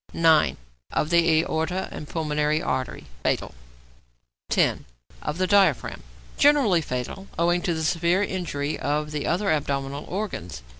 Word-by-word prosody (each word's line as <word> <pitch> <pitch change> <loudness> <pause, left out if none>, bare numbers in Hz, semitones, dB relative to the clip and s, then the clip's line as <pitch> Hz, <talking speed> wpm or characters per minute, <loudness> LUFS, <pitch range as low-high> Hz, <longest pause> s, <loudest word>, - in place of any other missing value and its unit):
9. 160 -2 +4 0.3
=Of 150 - -1
the 165 -2 +4
Aorta 170 +3 -2
and 150 - -8
Pulmonary 150 -1 0
Artery.= 130 - -3 0.2
Fatal. - - -1 1.0
10. - - +2 0.4
=Of 150 +2 -3
the 185 - +1
Diaphragm.= 190 - +2 0.4
Generally 275 - +5
fatal, 135 +8 -5
owing 175 +1 +2
to 170 -1 -1
the 160 - -2
severe 170 +4 +2
injury 160 -7 -3
of 150 +1 -1
the 150 -1 -3
other 195 +4 +1
abdominal 140 -1 -2
organs. 90 - -5
160 Hz, 135 wpm, -25 LUFS, 150-180 Hz, 1.0 s, Generally